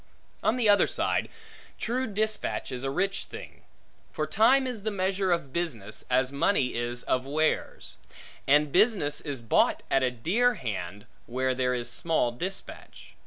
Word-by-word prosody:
On 220 - +2
the 245 -3 +2
other 205 -1 +5
side, - - 0 0.5
true 255 +3 -1
dispatch 215 -6 -2
is 125 0 -3
a 135 - -1
rich 195 +7 -1
thing. - - -11 0.5
For - - -2
time 260 +5 +4
is 245 -5 -4
the 220 - -1
measure 190 -1 0
of 160 -6 -1
business, 115 - -3
as 130 +1 +2
money 140 -2 +1
is 120 +1 -2
of 130 +1 -1
wares; 155 +2 -1 0.5
and 145 +1 +4
business 185 - +2
is 135 -5 -5
bought 115 - +2
at 135 - +4
a 130 - +2
dear 200 - +1
hand, 105 -4 -5 0.2
where 130 +2 0
there 125 0 0
is 120 -1 -3
small 120 +1 0
dispatch. 185 +11 -7
145 Hz, 160 wpm, -27 LUFS, 125-200 Hz, 0.5 s, other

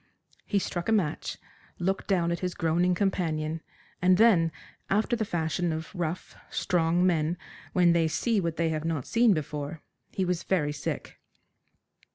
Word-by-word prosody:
He 205 - +1
struck 175 -1 -2
a - - +3
match, 190 -9 0 0.4
looked 190 +2 -1
down 175 -4 +2
at 170 - -1
his 180 -1 -3
groaning 175 +2 +2
companion, 165 -5 -1 0.4
and 180 0 +5
then, 185 -8 +5 0.4
after 215 +4 +2
the 225 - -1
fashion 170 -1 -1
of 160 0 -5
rough, 175 -1 -4
strong 175 0 +1
men 165 -1 +1 0.4
when 175 -2 +5
they 165 -1 +3
see 215 +6 +1
what 170 -2 -2
they 165 -1 +1
have 155 -1 -2
not 160 -5 -2
seen 230 -3 +4
before, 150 0 -4 0.3
he 190 - -1
was 180 -1 0
very 150 -6 +1
sick. - - -5
170 Hz, 160 wpm, -28 LUFS, 160-185 Hz, 0.4 s, and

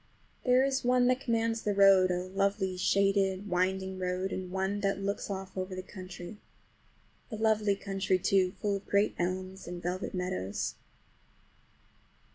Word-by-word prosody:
There 250 0 +4
is 270 0 0
one 250 0 +3
that 255 0 +2
commands 230 -2 0
the 205 -1 -1
road, 195 -2 +6
a 180 0 0
lovely, 195 0 0
shaded, 195 +1 +2
winding 190 +1 -1
road, 185 +1 -2
and 185 -1 -4
one 190 +2 -1
that 195 -1 +1
just 195 0 -6
looks 200 +1 -2
off 190 -1 -5
over 185 0 -4
the 185 - -5
country. 185 0 -9 0.9
A - - -3
lovely 215 -2 +2
country, 195 -1 0
too, 185 0 +2
full 205 -2 0
of 195 - -13
great 200 +1 +2
elms 185 +2 -3
and 175 0 -5
velvet 180 +2 -3
meadows. 100 - -2
195 Hz, 155 wpm, -30 LUFS, 185-205 Hz, 0.9 s, road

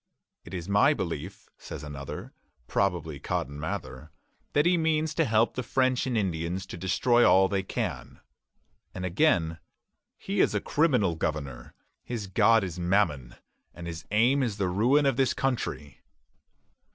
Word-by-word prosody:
"It - - -8
is 85 -1 -5
my 105 +9 +4
belief," 85 - -5
says - - -8
another, 70 -2 -7 0.3
probably 85 -4 -1
Cotton 70 +2 -3
Mather, 80 -2 -5 0.4
"that 145 +1 +3
he 175 +1 +4
means 160 -2 +1
to 165 0 +1
help 115 -1 +2
the 130 - -3
French 130 +1 +1
and 125 -3 0
Indians 90 -1 -2
to - - -8
destroy 120 +7 +2
all 95 -3 +6
they 95 0 -1
can." 95 - -5 0.8
And 90 - -4
again, 85 - +1 0.6
"He - - -3
is - - +2
a - - +2
criminal 125 - +2
governour.... 70 -6 -4 0.3
His 115 -4 -4
God 110 +3 +4
is 90 -2 -5
Mammon, 85 -9 0 0.4
his 85 -1 -7
aim 120 +7 +3
is 115 -6 -1
the 95 -3 0
ruin 125 +10 +3
of 135 -2 +1
his 130 - +2
country." 115 - -3
100 Hz, 150 wpm, -27 LUFS, 85-125 Hz, 0.8 s, all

